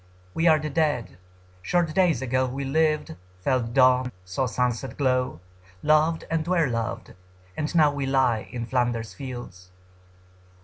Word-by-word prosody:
We 165 - +1
are 160 -1 +6
the 155 0 -4
Dead. 145 - -1 0.4
Short 165 - 0
days 175 -8 +2
ago 130 +1 +1
We 135 +2 -4
lived, 155 - +1 0.3
felt 120 -2 0
dawn, 130 -1 +4
saw 95 +8 -1
sunset 125 +1 -2
glow, 130 - 0 0.4
Loved 155 +2 +3
and 165 0 -1
were 175 -3 +2
loved, 115 -3 -4 0.4
and 155 - -3
now 155 -3 +5
we 140 -1 -3
lie, 130 -5 +1
In 120 -1 -4
Flanders 120 -2 -1
fields. 120 -9 -8
130 Hz, 140 wpm, -25 LUFS, 120-155 Hz, 0.4 s, are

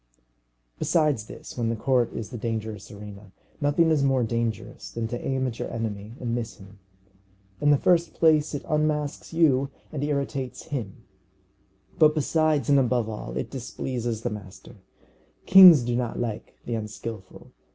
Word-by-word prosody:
Besides 150 -10 +1
this, - - -10
when 115 -2 -1
the 115 - 0
court 125 +1 +1
is 115 0 -6
the 120 - -5
dangerous 110 -3 -4
arena, 100 -1 -11 0.3
nothing 155 +3 +3
is 155 -3 +3
more 135 -2 +2
dangerous 115 -1 -3
than 115 -1 -3
to 120 +1 -5
aim 130 -1 -1
at 120 -3 -4
your - - -4
enemy 110 -2 -4
and 120 -2 -3
miss 120 -2 -3
him. 100 +1 -15 0.8
In 145 - +2
the 145 - +6
first 170 +2 +2
place, 155 -2 +3
it 145 - -6
unmasks 150 -2 -1
you 140 -5 +3 0.2
and 145 -2 -3
irritates 140 -3 -3
him; 125 -11 -6 1.0
but 155 0 +6
besides 155 -3 +1
and 140 -1 +5
above 125 -3 +1
all, 65 - -6
it 65 - -4
displeases 120 -3 -4
the - - -1
master. 105 +2 -10 0.7
Kings 180 -8 +9
do 120 0 -1
not 120 -1 -2
like 115 -3 -4
the 120 - -3
unskilful. 105 -2 -7
120 Hz, 160 wpm, -25 LUFS, 110-145 Hz, 1.0 s, Kings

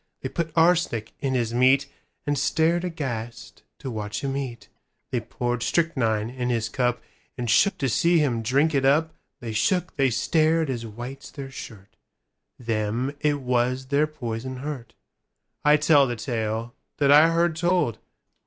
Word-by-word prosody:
They 130 - -3
put 165 +1 -3
arsenic 165 -10 +2
in 135 -2 -1
his 120 -2 0
meatAnd 140 +3 +1
stared 160 +5 +1
aghast 120 -9 -5 0.2
to 130 - -6
watch 105 +4 -4
him 135 -1 -2
eat; 120 -6 -5 0.4
They - - +1
poured 120 0 -3
strychnine 115 -7 +1
in 125 -1 -3
his 115 -2 0
cupAnd 125 0 -3
shook 200 - +4
to 135 - -1
see 170 +8 +3
him 130 -7 +1
drink 140 +8 +2
it 135 -2 +2
up:They 140 -4 -1
shook, 180 - 0
they 135 -2 +3
stared 160 +4 +2
as 115 -2 -4
white's 120 +5 -8
their 135 -2 -8
shirt:Them 115 +2 -6
it 145 -1 0
was 125 +1 0
their 145 +2 +2
poison 130 -3 -5
hurt.—I 145 +2 -3
tell 150 -2 +5
the 120 - -2
tale 115 0 -3 0.2
that 140 -1 +3
I 150 +3 +8
heard 170 0 +1
told. 175 - +1
130 Hz, 145 wpm, -25 LUFS, 120-150 Hz, 0.4 s, I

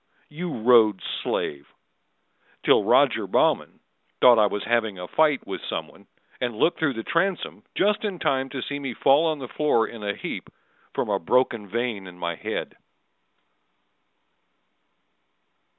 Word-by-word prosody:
You 170 +3 -5
Rhodes' 110 -5 +4 0.2
slave! 70 0 -3 1.0
Till - - +4
Roger - - +3
Baughman - - +1 0.4
Thought 120 -2 +7
I 105 - +5
was 100 0 -3
having 110 -3 0
a 90 0 -7
fight 155 - +2
with - - -6
some - - -3
one, - - -20 0.3
And 120 -3 -2
looked 165 - +2
through 155 -4 +1
the 115 -1 -5
transom 180 - -1
just 205 +2 +1
in 200 -4 -2
time 135 -4 0
To 130 -2 -5
see 145 0 -4
me 135 -4 -5
fall 145 +8 +4
on 155 -1 0
the 135 -3 -7
floor 135 -5 +1
in 115 - -10
a 100 0 -2
heap - - -6 0.5
From - - -1
a - - +1
broken 115 +2 +1
vein 115 -4 -3
in 90 -1 -12
my 85 -1 -3
head. - - -5
125 Hz, 150 wpm, -24 LUFS, 105-150 Hz, 1.0 s, Thought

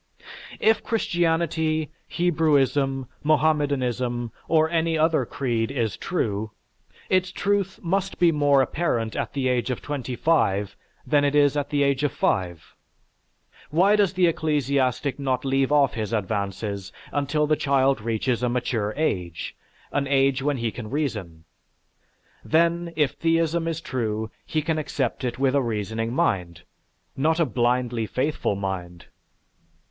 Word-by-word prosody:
If 220 0 +3
Christianity, 165 -6 0 0.2
Hebrewism, 145 -5 +1 0.2
Mohammedanism, 135 -6 +1 0.2
or 160 -1 +4
any 165 0 0
other 155 -5 +2
creed 115 -4 -1
is 115 -6 -1
true, 110 - -2 0.6
its 185 -1 +1
truth 200 -2 -1
must 195 +2 -1
be 175 -1 +4
more 145 -3 +4
apparent 120 -8 -1
at - - -3
the 135 -2 0
age 125 0 0
of 125 - -2
twenty 130 -4 -4
five 105 -10 +1 0.3
than 145 -1 +3
it 145 0 +1
is 145 -1 +4
at 145 0 -1
the 145 -1 +2
age 140 -1 +1
of 145 -2 +1
five. 85 -3 -1 1.0
Why 185 +7 +4
does 200 -3 +2
the 185 -1 +3
ecclesiastic 140 -4 0
not 130 -1 -1
leave 135 0 +1
off 145 -2 +4
his 110 -1 -3
advances 100 -1 -3 0.2
until 145 +1 0
the 155 +1 +2
child 135 -4 +2
reaches 115 +2 -1
a 125 - +1
mature 115 -4 -1
age, 90 - -2 0.4
an 140 -1 0
age 135 -1 +2
when 145 0 0
he 115 -2 -1
can 115 -2 -7
reason? 105 - -3 1.0
Then, 170 +1 +2
if 150 -3 +2
theism 165 +2 +1
is 165 -1 -2
true, 110 -5 -3 0.2
he 155 -1 -1
can 160 0 0
accept 140 -4 -2
it 120 -1 -2
with 135 0 +2
a 140 - +3
reasoning 115 -1 -2
mind, 90 - -1 0.5
not 160 +4 +1
a 165 - +4
blindly 120 -2 0
faithful 130 -3 -1
mind. 90 -3 -5
140 Hz, 140 wpm, -24 LUFS, 115-155 Hz, 1.0 s, or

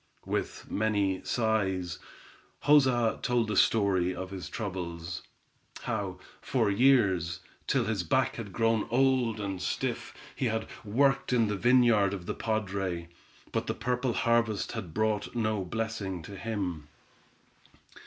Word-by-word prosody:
With - - -3
many 100 -3 +1
sighs, 95 -7 0 0.7
Joza 130 -6 +4
told 120 -3 +1
the 105 - -1
story 95 -4 +3
of 95 +1 -6
his 95 -2 -6
troubles; 90 -5 -4 0.6
how, 95 -2 -2 0.2
for 100 - +1
years, 100 -8 +3 0.3
till - - +2
his 105 -3 0
back 130 +10 +1
had 110 -4 -6
grown 115 +1 +1
old 125 -2 +2
and 95 -3 -3
stiff, - - -2 0.2
he - - -1
had 110 0 -1 0.2
worked 135 +5 +2
in 115 -4 +3
the 105 - 0
vineyard 115 -3 +4
of 90 -3 -8
the - - -2
padre, 95 -6 -2 0.4
but - - -1
the - - -1
purple 125 0 -1
harvest 115 -3 +1
had 85 - -5
brought 110 +3 -1
no 110 -4 0
blessing 100 -3 -3
to 100 - -9
him. 90 -6 -3
105 Hz, 135 wpm, -29 LUFS, 95-115 Hz, 0.7 s, Joza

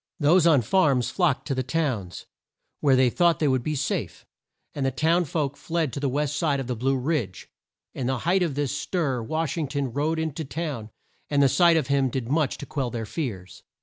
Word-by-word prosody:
Those 170 +3 +4
on 145 -7 +5
farms 140 - +2
flocked 170 -8 +1
to 140 - 0
the 130 - -1
towns, 130 - -2 0.5
where 140 -3 +4
they 130 -1 +4
thought 170 +2 +3
they 150 - +1
would 130 -2 +2
be 155 +5 -2
safe; 140 0 -3 0.5
and 140 - -3
the 135 - +2
towns 165 +3 +1
folks 145 -3 -2
fled 165 -5 -2
to - - -3
the 140 -1 0
west 145 +2 -1
side 150 -4 +1
of 135 - -3
the 125 0 -3
Blue 135 +4 0
Ridge. 125 - -2 0.5
In 125 - -3
the 130 0 0
height 175 +9 +1
of 165 -6 0
this 145 -1 -1
stir 145 -6 -1
Wash 160 +7 -2
ing 155 - -1
ton 140 -3 -3
rode 155 +4 0
in 160 -2 -2
to 160 - -4
town, 140 -7 -5 0.4
and 145 -1 +3
the - - +6
sight 170 +4 +4
of 155 - +1
him 140 -1 +1
did 125 -1 -4
much 150 -1 +1
to - - -7
quell 135 -4 -2
their 115 -2 -4
fears. 95 - -5
140 Hz, 220 wpm, -25 LUFS, 130-160 Hz, 0.5 s, the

